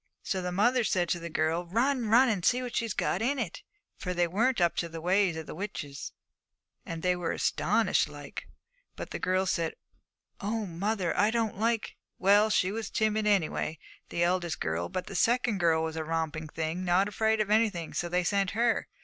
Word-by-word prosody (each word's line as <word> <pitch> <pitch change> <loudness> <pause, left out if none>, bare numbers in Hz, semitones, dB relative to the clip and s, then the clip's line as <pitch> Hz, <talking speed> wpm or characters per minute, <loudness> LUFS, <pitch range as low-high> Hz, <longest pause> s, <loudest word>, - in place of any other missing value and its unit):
'So 190 - -1
the 180 0 -3
mother 240 +7 +3
said 180 -4 +1
to 175 +1 0
the 170 0 -6
girl, 160 +2 0
"Run, 240 +5 +1
run, 245 +4 +6
and 205 -7 0
see 250 +6 +3
what 245 -1 -5
she 230 - +1
has 220 - -3
got 185 - 0
in 270 +5 +1
it." 215 -9 -4 0.4
For 180 -1 -4
they 175 0 +3
weren't 225 +9 +1
up 170 -1 +2
to 170 - -1
the 165 0 -7
ways 180 0 +2
of 160 - -6
witches, 150 -7 -6 0.7
and 165 -1 -6
they 180 0 +3
were 175 -2 -2
astonished - - +1
like. - - -9 0.5
But - - -7
the - - -4
girl, 185 +1 +1
she 190 - +1
said, 165 -1 -2 0.6
"Oh, 215 +2 -2
mother, 185 0 -1
I 205 - +3
don't 225 -3 -1
like." 225 0 0 0.2
Well, 205 +3 +5
she 185 -3 +2
was 220 -1 -4
timid, 215 -1 +1
anyway, 170 -5 +1 0.3
the 170 - 0
eldest 175 -1 0
girl. 80 +2 -2
But 185 - -3
the - - -8
second 235 0 +2
girl 165 -2 +3
was 160 0 -3
a 160 - -2
romping 160 -1 -2
thing, 160 +3 -3
not 185 +2 +3
afraid 220 +2 +1
of 210 -1 0
anything, 210 -7 +1
so 175 - -2
they 180 +1 +1
sent 195 +1 +1
her. 235 -1 +2
185 Hz, 205 wpm, -29 LUFS, 170-220 Hz, 0.7 s, run